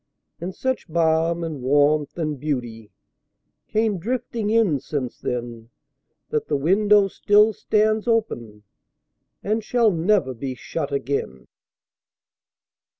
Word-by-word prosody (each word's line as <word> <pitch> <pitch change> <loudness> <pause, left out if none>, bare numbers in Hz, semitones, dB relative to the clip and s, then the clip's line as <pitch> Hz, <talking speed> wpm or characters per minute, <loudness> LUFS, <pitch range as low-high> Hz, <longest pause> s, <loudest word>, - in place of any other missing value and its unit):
And 180 +3 -5
such 260 -4 -2
balm 165 +1 +1
and 155 -5 -5
warmth 145 +3 +2
and 155 -4 -2
beautyCame 145 - -5
drifting 235 +1 -3
in 215 -10 +3
since 130 -3 -4
then, 120 -2 -5 0.6
That 150 - -1
the 145 - 0
window 200 +6 +4
still 210 +3 +3
stands 215 +2 +1
openAnd 120 - -1 1.0
shall 225 0 +2
never 170 -5 +1
be 130 +2 -5
shut 145 +2 -4
again. 140 - -3
160 Hz, 100 wpm, -23 LUFS, 135-210 Hz, 1.0 s, window